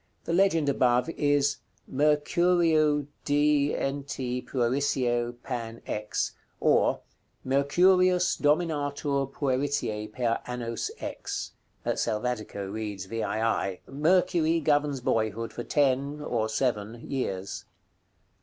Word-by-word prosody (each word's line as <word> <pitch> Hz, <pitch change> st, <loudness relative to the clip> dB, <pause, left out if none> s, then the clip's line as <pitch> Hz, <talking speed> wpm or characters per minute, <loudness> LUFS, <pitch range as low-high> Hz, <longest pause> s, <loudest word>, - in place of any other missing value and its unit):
The 165 Hz, -, -2 dB
legend 170 Hz, -5 st, +3 dB
above 125 Hz, +1 st, +2 dB
is 145 Hz, -2 st, +2 dB, 0.3 s
"MECUREU^s 155 Hz, +1 st, +3 dB, 0.2 s
DNT. 140 Hz, -3 st, 0 dB
PUERICIE 120 Hz, -2 st, 0 dB
PAN. 115 Hz, -3 st, -5 dB
X." 105 Hz, 0 st, -2 dB, 0.3 s
Or, -, -, +3 dB, 0.4 s
"Mercurius 180 Hz, +7 st, +3 dB
dominatur 145 Hz, -3 st, 0 dB
pueritiæ 130 Hz, -6 st, -1 dB
per 115 Hz, 0 st, 0 dB
annos 120 Hz, -2 st, -3 dB
X." -, -, -5 dB, 0.3 s
(Selvatico 110 Hz, -3 st, -2 dB
reads 105 Hz, -3 st, -4 dB
VII.) 110 Hz, -2 st, -1 dB
"Mercury 165 Hz, +2 st, +2 dB
governs 145 Hz, -3 st, +1 dB
boyhood 115 Hz, -1 st, -1 dB
for 120 Hz, -, -5 dB
ten 140 Hz, +1 st, +1 dB
(or 115 Hz, -7 st, -1 dB
seven) 115 Hz, -1 st, -2 dB
years." 95 Hz, -8 st, -3 dB
135 Hz, 90 wpm, -27 LUFS, 115-150 Hz, 0.4 s, legend